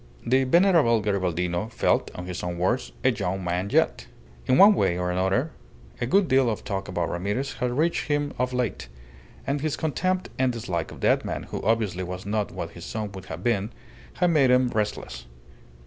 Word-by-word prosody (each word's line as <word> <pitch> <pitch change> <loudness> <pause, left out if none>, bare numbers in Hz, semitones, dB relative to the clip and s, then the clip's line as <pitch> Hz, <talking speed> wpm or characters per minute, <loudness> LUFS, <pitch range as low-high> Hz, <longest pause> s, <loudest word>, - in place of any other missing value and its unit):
The 130 +2 +3
venerable 165 - +4
Garibaldino 90 -1 -1
felt, - - +1
in 90 - -6
his 90 -1 -5
own 90 -1 -4
words, 85 -8 0
"a - - +5
young 95 +2 -3
man 90 +3 -1
yet." - - +1 0.4
In 130 - +4
one 205 +2 +9
way 90 - +1
or 90 0 -1
another 95 - 0 0.5
a 120 - 0
good 195 +6 +3
deal 130 -2 +3
of 110 - -3
talk 100 -5 -3
about 85 -2 -1
Ramirez 105 +10 -2
had 125 0 -1
reached 165 +3 +1
him 145 -1 0
of 125 0 0
late; 125 - -2 0.6
and 140 +1 -1
his 155 0 -1
contempt 185 +4 -1
and 130 -1 +3
dislike 95 -9 -3
of - - -11
that - - +3
man - - -4
who - - -6
obviously 105 -4 0
was 90 +1 -6
not 105 0 -1
what - - -5
his - - -11
son 110 -2 -4
would 95 -1 -9
have 85 +2 -7
been, 110 -3 +1 0.5
had 180 -1 +2
made 140 -5 +4
him 125 0 +4
restless. 105 - -3
110 Hz, 195 wpm, -25 LUFS, 90-130 Hz, 0.6 s, one